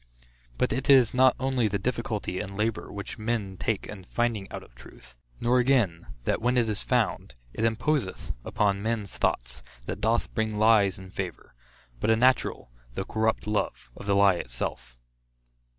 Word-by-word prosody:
But - - +1
it 130 +2 -3
is 130 -5 +6
not 130 0 +5
only 130 -3 +1
the 100 0 -1
difficulty 110 -6 -2
and 100 -2 -5
labor, 110 +1 -1
which 100 +1 -7
men 110 -4 -2
take 105 +2 -2
in 100 -3 -9
finding 110 0 -1
out - - -6
of - - -19
truth, 60 +1 -15 0.2
nor 125 +2 +3
again, 120 -10 +2 0.2
that - - 0
when 125 +2 +2
it 120 -2 +3
is 105 -2 -1
found, 65 - 0 0.2
it 110 - -3
imposeth 115 0 -1
upon 100 -1 +1
men's 110 -2 -2
thoughts, - - -1 0.2
that - - -5
doth 115 +2 +1
bring 110 -2 -1
lies 105 -3 +4
in 95 -1 -11
favor; 95 -4 -6 0.5
but 110 - 0
a 110 - +6
natural 125 - +2 0.2
though 95 - -2
corrupt 110 0 0
love, 105 - -2
of - - -9
the 100 - +3
lie 100 -2 +5
itself. 60 -1 -5
110 Hz, 170 wpm, -27 LUFS, 95-120 Hz, 0.5 s, is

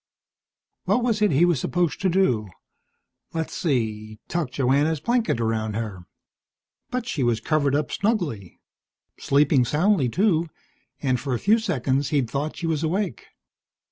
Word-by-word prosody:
What 245 - +2
was 225 -3 0
it 210 - +4
he 155 +3 +4
was 175 -6 +2
supposed 175 +3 -1
to 190 - +2
do? 130 - +2 0.9
Let's 160 -1 -3
see 110 -8 -2
Tuck 170 -6 -2
Joanna's 140 +4 +1
blanket 235 - 0
around 110 -2 -1
her. 105 -6 -5 0.8
But 250 -1 -3
she 170 - -3
was 120 -3 +2
covered 145 -3 +1
up 150 0 -1
snugly. 170 - -2 0.6
Sleeping 140 -2 +3
soundly, 150 - +2
too, 170 - +1 0.5
and 130 -3 +1
for 135 -3 -2
a - - -3
few 220 +3 +3
seconds 140 - 0
he'd 135 -6 0
thought 145 +3 -3
she 175 - -4
was 160 -2 0
awake. 175 - -2
150 Hz, 145 wpm, -24 LUFS, 125-180 Hz, 0.9 s, it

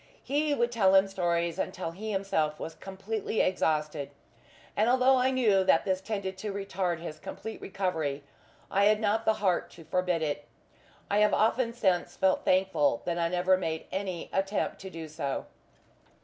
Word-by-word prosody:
He 295 +1 +1
would 240 -2 +1
tell 195 -5 +4
him 190 +1 +6
stories 170 -2 -1
until 185 -3 -3
he 210 +6 -6
himself 160 -6 0
was 165 - -5
completely 195 +4 -3
exhausted; 155 -5 0 0.7
and 215 +3 +3
although 260 +1 +5
I 255 +1 +3
knew 220 -7 +3
that 185 -3 +3
this 190 -1 0
tended 190 -2 -4
to 210 +1 -3
retard 195 -3 -2
his 160 -2 -7
complete 220 - -7
recovery, 160 -8 -2 0.5
I 200 +1 +3
had 210 +1 +4
not 220 +1 +1
the 220 - +4
heart 195 -5 0
to 165 - -13
forbid 180 0 0
it. 145 -1 -2 0.7
I 205 - +3
have 210 0 +4
often 230 +2 +2
since 190 -7 0
felt 190 -1 +2
thankful 185 -9 +2
that 175 0 -1
I 170 - +2
never 180 +1 +3
made 160 -3 -3
any 185 -3 -4
attempt 195 +2 -1
to 190 - -7
do 165 -3 -7
so. 140 -3 -3
190 Hz, 170 wpm, -29 LUFS, 170-210 Hz, 0.7 s, him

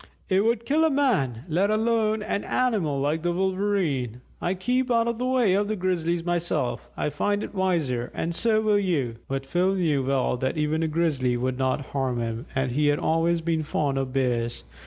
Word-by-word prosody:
It 190 +1 +3
would 230 0 +1
kill 300 +5 +2
a 320 - +4
man, 200 - +1
let 180 +5 +1
alone 220 0 +1
an 205 - -2
animal 205 - 0
like 150 +3 0
the 175 +1 0
Wolverene. 185 - -1 0.2
I 180 +2 0
keep 250 +7 0
out 230 -1 +3
of 235 -1 -2
the 250 - 0
way 250 -7 +3
of 205 +1 +1
the 215 - -1
Grizzlies 175 -3 -1
myself 175 -7 -1
I 150 - -1
find 205 +8 0
it - - -7
wiser, 160 - 0
and 170 +1 -2
so 220 +3 +2
will 210 -1 +3
you." 145 -12 -1
But 135 0 -3
Phil 180 +6 +1
knew 155 -7 +1
well 130 -1 +1
that 130 +4 -2
even 155 +1 0
a 165 - +1
Grizzly 150 -6 +1
would 130 +1 -2
not 130 +2 +1
harm 130 -3 0
him, 115 0 -4
and 130 -1 0
he 145 +4 +1
had 145 0 +3
always 165 +2 +1
been 160 -1 0
fond 145 -2 -1
of 135 -1 -3
Bears. 120 -3 -1
170 Hz, 200 wpm, -25 LUFS, 135-205 Hz, 0.2 s, a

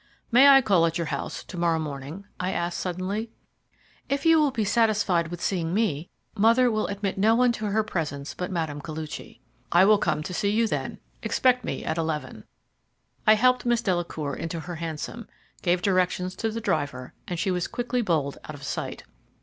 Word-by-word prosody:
"May 255 +4 +7
I 275 -1 +8
call 180 -6 +4
at 165 +1 -2
your 170 - -1
house - - -4
to 180 - -9
morrow 170 -1 +2
morning?" 150 +4 -6
I 185 +1 -1
asked 175 0 -2
suddenly. 185 +5 -3 0.8
"If 280 +2 -1
you 325 -1 +6
will 300 -2 +4
be 230 -5 -1
satisfied 210 -6 +2
with 175 +1 -7
seeing 175 -2 -1
me. 180 -8 0 0.3
Mother 230 +4 +4
will 215 -1 0
admit 200 -1 -3
no 220 +3 +4
one 250 0 +4
to 220 -2 -3
her 215 +2 +1
presence 150 -8 -4
but 180 - -4
Mme. 160 -5 -2
Koluchy." 155 0 -7 0.3
"I 175 +2 +6
will 210 0 +5
come 150 -5 0
to 180 - -6
see 200 +2 0
you 225 +3 +2
then; 220 - -3 0.2
expect 250 -1 +2
me - - -4
at 160 - -1
eleven." 160 -2 -3 0.8
I 215 - +8
helped 250 +3 +3
Miss 240 -1 +1
Delacour 170 -6 -2
into 165 0 -4
her 175 0 -6
hansom, 165 +8 -5 0.3
gave 175 0 +1
directions 185 -1 +1
to 225 - -1
the 225 +1 -4
driver, 140 - -2
and 175 - -3
she 185 +3 0
was 180 -1 -1
quickly 245 0 -2
bowled 155 -9 0
out 155 - -7
of 140 - -12
sight. - - -4
185 Hz, 190 wpm, -26 LUFS, 165-220 Hz, 0.8 s, I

